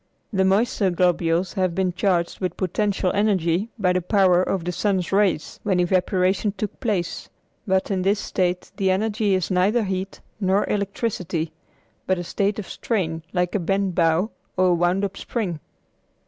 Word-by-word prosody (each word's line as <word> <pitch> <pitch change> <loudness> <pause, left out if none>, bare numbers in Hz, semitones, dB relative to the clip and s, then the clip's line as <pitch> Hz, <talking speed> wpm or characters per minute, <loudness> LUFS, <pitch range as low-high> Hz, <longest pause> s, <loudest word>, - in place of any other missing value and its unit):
The 190 -1 +3
moisture 195 +1 +2
globules 175 0 +1
have 185 -4 0
been 185 -1 0
charged 175 -2 0
with 180 -3 -3
potential 190 0 0
energy 195 -1 +1
by 185 -4 +2
the 185 - +1
power 180 -1 +4
of 185 -1 -1
the 180 - -1
sun's 185 -1 0
rays 195 -6 +1
when 190 -4 +1
evaporation 185 +2 +1
took 210 - -4
place; 200 -9 -2 0.4
but 190 +1 +1
in 190 -1 0
this 200 +2 +2
state 180 -2 -1
the 195 -2 +1
energy 205 +1 +1
is 185 +1 -1
neither 200 +6 +3
heat 190 -1 -3 0.2
nor 195 0 +2
electricity, 190 -5 -2 0.6
but 185 - +2
a 175 - -3
state 200 +3 -1
of 210 - -5
strain 165 -8 -2
like 180 -1 0
a 205 - +1
bent 195 +1 0
bow 170 +4 +2 0.3
or 185 0 +4
a - - +4
wound 175 +3 +2
up 200 0 -6
spring. 190 -10 -3
190 Hz, 165 wpm, -23 LUFS, 180-200 Hz, 0.6 s, power